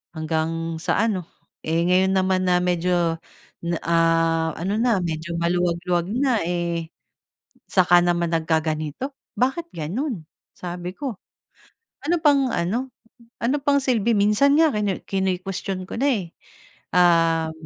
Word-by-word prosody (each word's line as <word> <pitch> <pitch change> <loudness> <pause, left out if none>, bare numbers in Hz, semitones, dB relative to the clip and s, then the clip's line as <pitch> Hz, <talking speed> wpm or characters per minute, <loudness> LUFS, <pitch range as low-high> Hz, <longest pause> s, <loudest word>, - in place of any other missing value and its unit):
hanggang 160 +1 -2
sa 185 - +1
ano, 190 -7 -1 0.4
eh, 165 +1 +1
ngayon 185 +2 +3
naman 185 -1 +1
na 180 0 +3
medyo 175 -2 +1 0.4
na 170 0 -2
ah, 165 -1 +2
ano 195 +6 -2
na, 230 -6 +2
medyo 170 0 -4
maluwag-luwag 175 0 0
na, 255 -3 +2
eh, 170 -2 -2 0.8
saka 175 -2 +5
naman 175 -1 +1
nagkaganito, 160 - -2 0.2
bakit 315 +7 0
gano'n?" 180 - -4 0.3
Sabi 175 0 -6
ko, 260 -3 -5 0.9
"Ano 340 +3 +1
pang 280 -5 +3
ano, 240 +10 -2 0.5
ano 250 +5 +2
pang 280 0 +2
silbi?" 235 -3 +2
Minsan 210 +8 +4
nga 320 0 +5
kinuwe 205 -5 -2
kinu-question 190 0 -2
ko 190 - -6
na, 280 - +2
eh, 200 -11 -1 0.6
um, 165 -2 +4
180 Hz, 125 wpm, -23 LUFS, 165-225 Hz, 0.9 s, saka